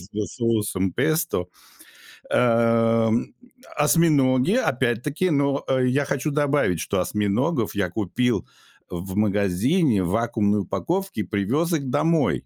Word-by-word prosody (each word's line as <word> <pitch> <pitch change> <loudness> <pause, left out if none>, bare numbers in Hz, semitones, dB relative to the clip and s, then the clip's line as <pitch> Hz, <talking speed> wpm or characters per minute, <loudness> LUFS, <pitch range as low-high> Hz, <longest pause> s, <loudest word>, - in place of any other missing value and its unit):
с 90 - -14 0.3
соусом 105 -6 -1
песто, 155 - 0 0.8
а, 115 -1 +2 0.7
осьминоги 150 -3 +3
опять-таки. 135 - 0
Но 140 -2 0 0.2
я 125 +3 +1
хочу 140 +2 -2
добавить, 145 - +1
что 100 - -2
осьминогов 105 - -1
я 100 -3 -1
купил 115 +6 -1 0.4
в 95 +2 -6
магазине 105 - +1
в 85 - -2
вакуумной 105 -1 0
упаковке 180 - -3
и - - -1
привез 125 - -1
их 140 -5 -2
домой. 155 +2 +1
120 Hz, 110 wpm, -23 LUFS, 105-145 Hz, 0.8 s, осьминоги